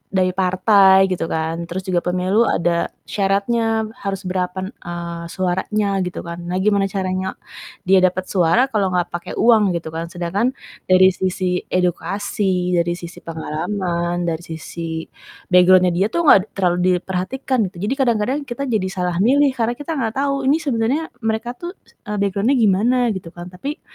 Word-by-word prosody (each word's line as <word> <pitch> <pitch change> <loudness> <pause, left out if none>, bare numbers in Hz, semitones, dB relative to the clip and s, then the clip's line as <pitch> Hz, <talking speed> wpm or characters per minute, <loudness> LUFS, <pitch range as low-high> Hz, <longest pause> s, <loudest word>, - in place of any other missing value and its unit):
dari 185 -1 +3
partai, 190 +1 +4
gitu 175 -2 -1
kan, 165 +1 -3
terus 185 +3 -5
juga 185 -2 0
pemilu 185 +6 +1
ada 170 0 +1 0.2
syaratnya 220 +3 0 0.2
harus 195 -1 -4
berapan 185 +1 -3
eee, 170 -5 -7
suaranya, 195 +3 -1
gitu 180 - -6
kan. 170 0 -7
Nah, 180 - -2
gimana 200 -1 +2
caranya 190 -1 -3 0.5
dia 190 +1 +5
dapat 185 0 +1
suara, 195 +9 +2
kalau 200 -3 +1
enggak 175 -1 0
pakai 175 +1 -6
uang, 215 -6 +4
gitu 165 -1 -4
kan, 165 +1 -4
sedangkan 185 +9 -1 0.3
dari 185 0 +6
sisi 185 -1 -1
edukasi, 185 0 -1
dari 170 0 +1
sisi 175 0 -9
pengalaman, 170 +2 -3
dari 165 -2 -1 0.2
sisi 160 0 -5 0.5
background-nya, 180 0 +6
dia 185 +4 +1
tuh 340 - -1
enggak 200 - +8 0.2
terlalu 180 -3 +1 0.2
diperhatikan, 200 +7 -2
gitu. - - -32
Jadi - - +1
kadang-kadang, 245 +1 +1
kita 250 +3 -4
jadi 205 -4 0
salah 180 -2 -2
milih, 275 +7 +4
karena 235 0 +1
kita 295 +2 -4
enggak 225 -3 -2
tahu 275 -1 -1
ini 285 +3 +4
sebenarnya 270 +4 -1
mereka 225 +1 -2
tuh, 350 +2 -6 0.3
eee, 210 - -2
background-nya 200 +6 +1
gimana, 225 +1 +3
gitu 190 -4 -6
kan, 175 +1 -9
tapi 275 - -6
190 Hz, 160 wpm, -20 LUFS, 175-220 Hz, 0.5 s, enggak